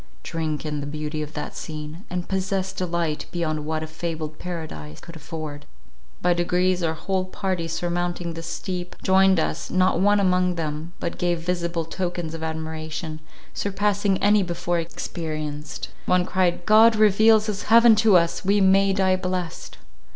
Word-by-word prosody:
Drink 155 -2 -3
in 150 -1 -2
the 145 - -5
beauty 155 +1 -4
of 150 +1 -6
that - - -5
scene, 155 +3 -7
and 180 0 -3
possess 190 0 -1
delight 170 -5 -2
beyond 155 -3 -2
what 155 0 -1
a - - -2
fabled 160 -1 -5
paradise 155 - -6
could 170 - -12
afford." 155 -2 -7 0.6
By 180 0 +4
degrees, 180 +1 +1
our 160 -1 0
whole 190 +3 -1
party 185 -2 -2
surmounting 175 0 -2
the 165 - -6
steep, 180 +2 -5
joined 190 -1 +5
us, - - -2
not 185 -2 +2
one 205 +2 +4
among 180 -2 +2
them, 160 +1 -4
but 170 - -4
gave 175 -1 0
visible 170 -1 -1
tokens 175 -1 -3
of 165 - -6
admiration, 160 0 -4 0.3
surpassing 200 0 0
any 205 0 +5
before 175 -1 -1
experienced. 155 -3 -5 0.2
One 180 -1 +3
cried, 180 -2 0
"God 220 +1 +7
reveals 215 +1 +5
his 205 -2 -3
heaven 230 0 +8
to 215 -3 +6
us; 170 -1 0
we 200 +2 +3
may 195 0 +4
die 190 -1 +2
blessed." 180 -2 -4
175 Hz, 160 wpm, -24 LUFS, 160-190 Hz, 0.6 s, heaven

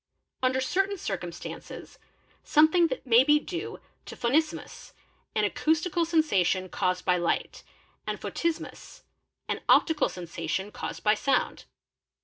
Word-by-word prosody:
i 255 - +4
Under 260 +1 0
certain 390 +8 0
circumstances, 175 - -7 0.4
something 315 +3 +4 0.2
may 240 0 +6
be 295 +2 +5
due 360 +7 -5 0.3
to - - -8
Phonismus, 305 +6 -1 0.4
an - - +2
'acoustical 320 +2 +1
sensation 195 - +1
caused 180 0 -1
by 180 -1 +3
light, 175 -1 -1 0.5
and - - -3
Photismus, 335 -1 -4 0.4
an - - -2
optical 320 -2 +4
sensation 175 +2 -4
caused - - -6
by 210 - +5
sound. 270 +5 0
265 Hz, 120 wpm, -27 LUFS, -, 0.5 s, may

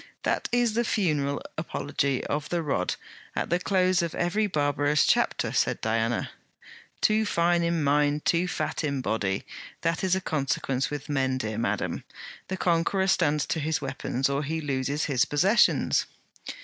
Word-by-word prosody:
'That - - 0
is 240 -2 +2
the 235 +2 +1
funeral 150 -11 0 0.2
apology 140 -4 -1
of 145 0 -2
the 170 -1 -1
Rod, 135 -12 -1 0.4
at - - -2
the 175 - +3
close 185 -1 +2
of 170 -2 -3
every 205 +5 +1
barbarous 145 -3 +2
chapter,' - - +1
said - - +1
Diana. 115 +1 -1 0.7
'Too 215 +1 +3
fine 175 -4 +2
in 170 -2 0
mind, 145 +1 +2
too 175 +1 +2
fat 180 - -2
in 140 -3 -1
body; 100 -5 -1 0.4
that 165 +1 0
is 185 -1 +3
a - - 0
consequence 135 -5 -1
with 145 -1 -5
men, 135 -3 0
dear 110 -3 -3
madam. 115 - -2 0.4
The 190 - -3
conqueror 175 +2 +1
stands 150 -6 +2
to 160 - -2
his 155 +1 0
weapons, 135 -1 -2
or 140 +1 -1
he 160 +2 -2
loses 140 0 -1
his 130 -4 +2
possessions.' 190 +10 +3
150 Hz, 160 wpm, -27 LUFS, 140-175 Hz, 0.7 s, the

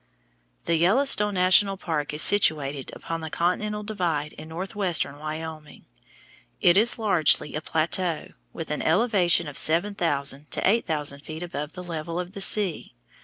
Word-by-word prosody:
The 170 - +1
Yellowstone 210 - +3
National 190 +2 +4
Park 155 -5 -3
is 150 +1 +2
situated 145 -8 +2
upon 165 0 -5
the 160 - -5
continental 210 +6 -1
divide 170 -8 -2
in 155 - -11
northwestern 175 -4 -2
Wyoming. 155 0 -7 0.7
It 175 - +5
is 225 +5 +3
largely 180 -9 +2
a 155 - -3
plateau, 165 +2 -1 0.2
with - - -7
an - - -2
elevation 175 -3 +3
of 145 - -4
seven 170 +6 +1
thousand 145 -5 -1
to - - 0
eight 225 +4 +2
thousand 150 -3 -1
feet 155 +3 -8
above 150 -3 -5
the 180 - -8
level 165 0 -5
of 180 0 -5
the 200 -1 -8
sea. 195 -4 -1
170 Hz, 155 wpm, -25 LUFS, 155-195 Hz, 0.7 s, It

